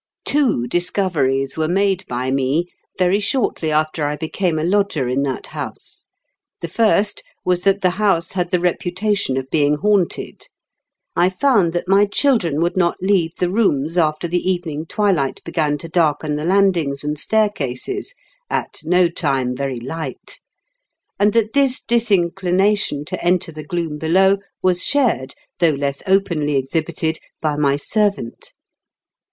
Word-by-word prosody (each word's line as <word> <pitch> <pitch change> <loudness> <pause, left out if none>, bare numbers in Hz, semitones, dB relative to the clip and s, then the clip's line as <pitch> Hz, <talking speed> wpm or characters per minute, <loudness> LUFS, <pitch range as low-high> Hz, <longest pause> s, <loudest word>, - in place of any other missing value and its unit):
Two 270 - +1
discoveries 150 -4 0
were 155 -1 0
made 190 +1 0
by 125 +1 -2
me 135 +5 +1 0.3
very 185 +2 +2
shortly 205 -6 -1
after 155 0 0
I 145 0 0
became 160 +2 -2
a 155 - -1
lodger 185 -7 +1
in 130 +2 0
that 135 -2 -3
house. - - -8 0.5
The 170 - -4
first 210 +2 +1 0.2
was 180 -1 +1
that 195 0 +3
the 185 - +3
house 190 -5 +2
had 180 -2 -2
the 180 - +1
reputation 180 -2 -1
of 130 0 -3
being 150 -1 +3
haunted. 200 +2 -1 0.7
I 175 +2 +4
found 195 -3 +2
that 175 +1 -2
my 195 +2 +5
children 200 - +1
would 170 +1 0
not 175 -2 +1
leave 185 -4 +1
the 180 -1 0
rooms 165 -7 +1
after 155 -1 +1
the 175 +1 0
evening 165 -4 -2
twilight 180 -11 0
began 155 -3 0
to 155 - -7
darken 155 -3 +1
the 150 +1 -3
landings 175 -7 +2
and 150 0 -2
staircases, 215 - -1 0.3
at - - -2
no 180 +2 +3
time 135 -7 -1
very 135 -2 -3
light; 135 +3 -7 0.8
and 205 +1 +4
that 220 -1 +1
this 275 -2 +2
disinclination 195 -5 +1
to - - -5
enter 175 -1 +1
the 155 -1 -8
gloom 165 -4 -3
below 190 +5 +3 0.2
was 180 -1 +2
shared, 235 - +1 0.2
though 170 - +4
less 140 -1 -2
openly 170 -7 +1
exhibited, 160 +4 -2 0.2
by 155 -2 -1
my 140 -2 +2
ser 210 +8 +2
vant. 120 -12 -10
170 Hz, 150 wpm, -19 LUFS, 150-195 Hz, 0.8 s, my